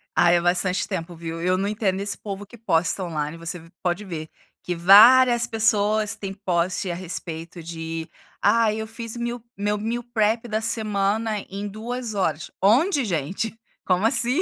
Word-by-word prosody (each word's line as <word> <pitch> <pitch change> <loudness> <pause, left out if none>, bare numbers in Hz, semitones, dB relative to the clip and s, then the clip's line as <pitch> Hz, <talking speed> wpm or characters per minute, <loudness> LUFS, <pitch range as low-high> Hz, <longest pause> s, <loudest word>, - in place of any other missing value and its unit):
Ah, 175 - +5
é 175 0 +3
bastante 180 +1 +1
tempo, 175 -3 -5
viu. 165 0 -6
Eu 180 +1 +1
eu 185 - +2
não 195 +1 -1
entendo 205 -3 -1
esse 200 0 -1
povo 200 -1 -7
que 235 +4 -15
posta 180 -3 0
on-line, 155 -1 -4
você 170 +1 -4
v 165 +1 -16
pode 180 +3 -1
ver 160 -4 -6 0.3
que 180 - -3
várias 235 +7 +7
pessoas 215 -2 +1
têm 195 -1 -6
post 185 -1 -1
a - - -3
respeito 170 -1 -6
de: 165 0 -6 0.3
"Ai, 225 -2 +3
eu 220 - -5
fiz 230 0 -6
meal, 240 0 -4 0.2
meu 205 +1 -1
meal 230 +3 -3
prep 220 +2 +1
da 215 -1 -1
semana 215 -1 0
em 200 +2 -5
2 230 +3 -5
horas", 160 -5 -1
onde 275 - +3
gente? 190 +5 -3 0.3
Como 185 +2 +1
assim? 245 +7 +7
200 Hz, 175 wpm, -23 LUFS, 175-225 Hz, 0.3 s, várias